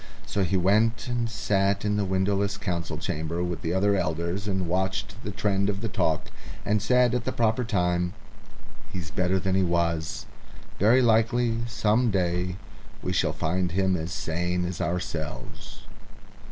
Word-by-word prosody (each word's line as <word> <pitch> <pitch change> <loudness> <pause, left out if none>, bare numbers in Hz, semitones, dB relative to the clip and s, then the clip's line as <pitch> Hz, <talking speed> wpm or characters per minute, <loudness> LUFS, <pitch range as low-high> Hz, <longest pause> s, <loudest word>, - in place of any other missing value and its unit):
So 100 - 0
he 95 +1 +1
went 110 +6 +2
and 120 -1 -1
sat 100 -2 +1
in 105 0 +1
the 105 -1 +1
windowless 100 +1 0
council 90 -5 -3
chamber 80 +3 -2
with 90 -1 -3
the 80 - -2
other 100 +2 +3
elders 85 +3 -1
and 95 -3 -1
watched 95 +3 -1
the - - -4
trend 100 -1 0
of 95 -1 -2
the 115 - -1
talk, 90 -7 0 0.3
and 105 0 +2
said, 125 +1 +3
at 125 -1 0
the - - -1
proper 115 +1 +1
time, 90 -5 0 0.8
"He's 85 -5 -5
better 90 +3 +1
than 95 +1 0
he 95 - +3
was. 85 -2 0 0.5
Very 120 +6 +5
likely, 115 0 +3
some 115 +1 +2
day, 90 -2 0 0.5
we - - -1
shall - - +2
find 90 +1 -1
him 95 0 +2
as 80 0 -3
sane 90 +2 -1
as 90 -1 -4
ourselves." 85 -2 -4
95 Hz, 160 wpm, -26 LUFS, 90-105 Hz, 0.8 s, Very